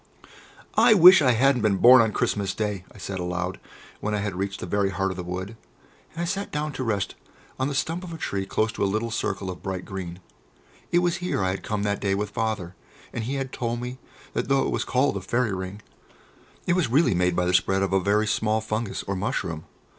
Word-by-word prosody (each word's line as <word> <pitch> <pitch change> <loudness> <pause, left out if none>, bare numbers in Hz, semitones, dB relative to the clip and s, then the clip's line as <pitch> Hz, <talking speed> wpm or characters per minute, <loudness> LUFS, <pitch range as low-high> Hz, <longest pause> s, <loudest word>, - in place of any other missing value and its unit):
"I 225 0 +6
wish 185 0 +9
that 145 - +2
I 125 - +5
hadn't 130 +1 +3
been 105 -3 +2
born 125 +4 +8
on 110 -2 +2
Christmas 100 -2 -1
Day!" 105 -4 -2
I - - -15
said 95 -1 -5
aloud, 90 +1 -3 0.4
when 105 0 -1
I - - 0
had 100 -2 -3
reached 95 +1 -3
the - - -5
very 100 +2 +1
heart 95 +1 -1
of - - -6
the 90 - -4
wood, 90 +5 -5 0.6
and 165 - -5
I - - 0
sat 195 +3 -3
down 150 +1 -2
to 130 - -3
rest 105 -5 -1 0.5
on 130 - +1
the 145 - -3
stump 165 +6 -1
of 180 - -7
a 165 - -6
tree 100 -9 -3
close 110 +3 0
to - - -3
a 100 - +2
little 110 +3 -1
circle 100 -4 -2
of 90 - -10
bright 95 -1 -4
green. 90 -2 -6 0.7
It 175 +1 +3
was 175 +1 +1
here 180 - -1
I 95 - +1
had 95 0 -4
come 105 0 -2
that 100 -1 -1
day 100 -1 +1
with 105 +1 -3
Father, 105 -6 -2 0.4
and 115 - -3
he 135 +4 -2
had 135 -1 -3
told 120 -1 -2
me 125 +1 -6 0.3
that - - -2
though 135 0 +3
it - - -1
was - - 0
called 130 -4 +1
a - - -5
"Fairy 115 +2 0
Ring," 95 +2 -6 0.8
it 175 - +2
was 180 -3 +2
really 140 0 +4
made 90 0 +1
by 90 - +1
the 90 - +1
spread 95 +1 +3
of 95 -1 -1
a 95 - +4
very 105 +3 +2
small 110 +1 +1
fungus, 110 -1 -3
or 100 - -3
mushroom. 95 - -3
105 Hz, 240 wpm, -25 LUFS, 95-130 Hz, 0.8 s, wish